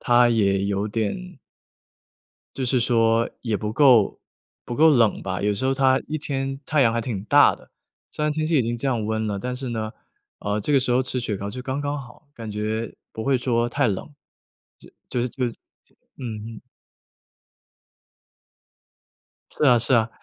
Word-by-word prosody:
它 120 Hz, -1 st, +4 dB
也 100 Hz, -4 st, +2 dB
有 100 Hz, +1 st, -1 dB
点 135 Hz, -, -3 dB, 1.2 s
就 130 Hz, -, -2 dB
是 125 Hz, 0 st, +2 dB
说 115 Hz, -1 st, +2 dB
也 115 Hz, -3 st, -1 dB
不 105 Hz, +1 st, -3 dB
够 120 Hz, -4 st, +4 dB, 0.5 s
不 120 Hz, -, -5 dB
够 160 Hz, +5 st, +6 dB
冷 115 Hz, -7 st, +3 dB
吧， 95 Hz, 0 st, -3 dB
有 105 Hz, 0 st, +1 dB
时 115 Hz, +6 st, -2 dB
候 135 Hz, -, +2 dB
它 130 Hz, -1 st, +3 dB
一 155 Hz, -, -2 dB
天 135 Hz, -2 st, -3 dB
太 150 Hz, +1 st, +1 dB
阳 120 Hz, -4 st, +5 dB
还 115 Hz, -, -1 dB
挺 110 Hz, -5 st, -4 dB
大 110 Hz, -, +5 dB
的。 -, -, -20 dB, 0.4 s
虽 -, -, -5 dB
然 150 Hz, -, +1 dB
天 155 Hz, +1 st, -1 dB
气 160 Hz, -1 st, +2 dB
已 130 Hz, -, +4 dB
经 120 Hz, +1 st, -2 dB
降 120 Hz, -4 st, -1 dB
温 110 Hz, 0 st, -1 dB
了， 100 Hz, -2 st, -2 dB
但 125 Hz, +5 st, -4 dB
是 130 Hz, +1 st, -5 dB
呢， 110 Hz, -1 st, -3 dB, 0.5 s
呃， 105 Hz, +1 st, -2 dB
这 125 Hz, +8 st, -1 dB
个 140 Hz, -, +5 dB
时 125 Hz, -, -1 dB
候 125 Hz, +2 st, +3 dB
吃 130 Hz, -1 st, -1 dB
雪 110 Hz, -3 st, -2 dB
糕 100 Hz, +1 st, -5 dB
就 125 Hz, -, -7 dB
刚 130 Hz, +3 st, -3 dB
刚 145 Hz, 0 st, -2 dB
好， 125 Hz, +3 st, -15 dB
感 115 Hz, -5 st, -8 dB
觉 110 Hz, +2 st, -3 dB, 0.2 s
不 110 Hz, -, -5 dB
会 135 Hz, +2 st, +2 dB
说 120 Hz, -1 st, 0 dB
太 140 Hz, +2 st, +1 dB
冷， 105 Hz, +7 st, -3 dB, 0.7 s
就 -, -, -15 dB, 0.2 s
就 125 Hz, -, -1 dB
是 125 Hz, -, -1 dB
就 125 Hz, +1 st, -3 dB
是， 120 Hz, -, -4 dB, 0.3 s
就 -, -, -30 dB, 0.2 s
嗯 115 Hz, -5 st, -6 dB, 0.2 s
哼。 -, -, -11 dB, 2.9 s
是 -, -, -1 dB
啊 125 Hz, -4 st, +6 dB
是 120 Hz, +3 st, +4 dB
啊， 115 Hz, -1 st, +3 dB
120 Hz, 205 characters per minute, -23 LUFS, 110-135 Hz, 2.9 s, 够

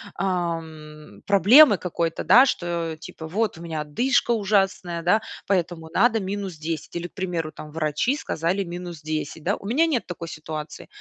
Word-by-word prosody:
ам, 160 Hz, -, -4 dB
проблемы 205 Hz, -, +7 dB
какой-то, 170 Hz, -2 st, -2 dB
да, 255 Hz, +2 st, +7 dB
что, 170 Hz, -8 st, -2 dB
типа, 160 Hz, -, -9 dB
вот 205 Hz, +2 st, -1 dB
у -, -, -11 dB
меня 160 Hz, -2 st, -4 dB
одышка 240 Hz, -, +1 dB
ужасная, 195 Hz, -5 st, +1 dB
да, 195 Hz, +6 st, +3 dB, 0.2 s
поэтому 175 Hz, -4 st, -1 dB
надо 225 Hz, 0 st, +3 dB
минус 195 Hz, -1 st, -4 dB
10. 155 Hz, 0 st, -5 dB
Или, 170 Hz, 0 st, -3 dB
к -, -, -43 dB
примеру, 175 Hz, -5 st, -3 dB
там, 155 Hz, -1 st, -10 dB
врачи 155 Hz, -, 0 dB
сказали: 180 Hz, -, -1 dB
"Минус 175 Hz, -2 st, -7 dB
10". 155 Hz, 0 st, -4 dB
Да. 200 Hz, +5 st, +1 dB
У -, -, -13 dB
меня 295 Hz, +10 st, +3 dB
нет 275 Hz, -8 st, -1 dB
такой 170 Hz, -2 st, -6 dB
ситуации. 155 Hz, -1 st, -7 dB
175 Hz, 165 wpm, -24 LUFS, 160-200 Hz, 0.2 s, проблемы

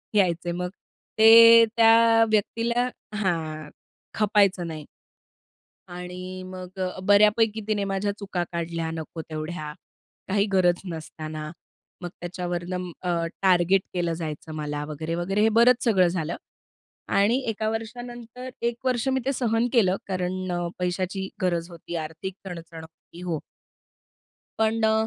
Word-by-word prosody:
यायचे, 175 Hz, -3 st, +2 dB
मग 180 Hz, +1 st, -3 dB, 0.5 s
ते 230 Hz, +1 st, +9 dB
त्या 225 Hz, 0 st, +6 dB
व्यक्तीला 235 Hz, +3 st, +1 dB, 0.3 s
हां, 160 Hz, -6 st, -2 dB, 0.5 s
खपायचं 200 Hz, -4 st, +2 dB
नाही. 155 Hz, -2 st, -7 dB, 1.0 s
आणि 180 Hz, +1 st, -7 dB
मग 185 Hz, 0 st, -9 dB
अ, 185 Hz, 0 st, -3 dB
बऱ्यापैकी 210 Hz, +2 st, +4 dB
तिने 210 Hz, -2 st, 0 dB
माझ्या 195 Hz, +1 st, 0 dB
चुका 195 Hz, -3 st, -2 dB
काढल्या 165 Hz, -1 st, -3 dB
नको 160 Hz, 0 st, -6 dB
तेवढ्या 155 Hz, 0 st, -5 dB, 0.6 s
काही 200 Hz, +1 st, +2 dB
गरज 180 Hz, -2 st, +3 dB
नसताना. 155 Hz, -1 st, -7 dB, 0.5 s
मग 175 Hz, -, -4 dB
त्याच्यावरून 175 Hz, 0 st, -4 dB, 0.3 s
अ, 180 Hz, -, -3 dB, 0.3 s
टार्गेट 185 Hz, 0 st, +4 dB
केलं 175 Hz, -2 st, 0 dB
जायचं 155 Hz, 0 st, -6 dB
मला. 150 Hz, -1 st, -3 dB
वगैरे, 160 Hz, +2 st, -4 dB
वगैरे, 190 Hz, +4 st, 0 dB
हे 220 Hz, -, +5 dB
बरंच 245 Hz, +1 st, +5 dB
सगळं 190 Hz, -6 st, +4 dB
झालं. 170 Hz, -1 st, -2 dB, 0.7 s
आणि 205 Hz, +5 st, +3 dB
एका 215 Hz, 0 st, -1 dB
वर्षानंतर 240 Hz, +2 st, -6 dB
1 235 Hz, 0 st, 0 dB
वर्ष 255 Hz, 0 st, 0 dB
मी 265 Hz, -, +1 dB
ते 275 Hz, -, +2 dB
सहन 235 Hz, -2 st, +1 dB
केलं, 195 Hz, -7 st, +4 dB
कारण 185 Hz, 0 st, -2 dB
अ, 175 Hz, 0 st, -1 dB
पैशाची 185 Hz, +2 st, -2 dB
गरज 175 Hz, -2 st, 0 dB
होती 170 Hz, 0 st, -8 dB
आर्थिक 160 Hz, +5 st, -7 dB
चणचण 170 Hz, -3 st, -8 dB
होती 160 Hz, +1 st, -15 dB
हो. 170 Hz, -4 st, -2 dB, 1.2 s
पण 220 Hz, 0 st, +1 dB
अ, 220 Hz, -, +3 dB
185 Hz, 130 wpm, -25 LUFS, 170-220 Hz, 1.2 s, ते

